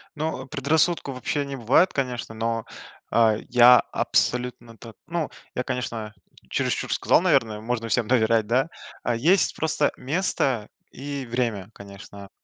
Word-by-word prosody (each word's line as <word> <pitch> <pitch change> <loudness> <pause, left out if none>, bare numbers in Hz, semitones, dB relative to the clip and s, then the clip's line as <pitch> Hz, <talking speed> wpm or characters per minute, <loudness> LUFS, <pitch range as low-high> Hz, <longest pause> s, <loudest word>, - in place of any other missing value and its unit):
Ну, 155 -4 -3
предрассудков, 155 0 0
вообще, 140 +3 -2
не 140 0 -5
бывает 135 +9 +3
конечно. 125 -4 -3
Но, 115 0 -2 0.5
э, 110 -2 +3
я 125 0 +8
абсолютно 120 -2 -1
так 115 -1 -12
ну, 170 -1 -2 0.3
я, 125 - -1
конечно, 115 -4 -4 0.4
чересчур - - -1
сказал, - - +3
наверное, 110 -2 +2
"Можно 115 0 -3
всем 115 -1 +1
доверять", 115 -3 +2
да, 130 +7 +1 0.4
э, 120 - +1
есть 170 +9 +3
просто 155 -2 0
место 135 - -1 0.2
и 140 0 -6
время 115 -5 -2
конечно. 100 0 -12
125 Hz, 135 wpm, -24 LUFS, 115-140 Hz, 0.5 s, я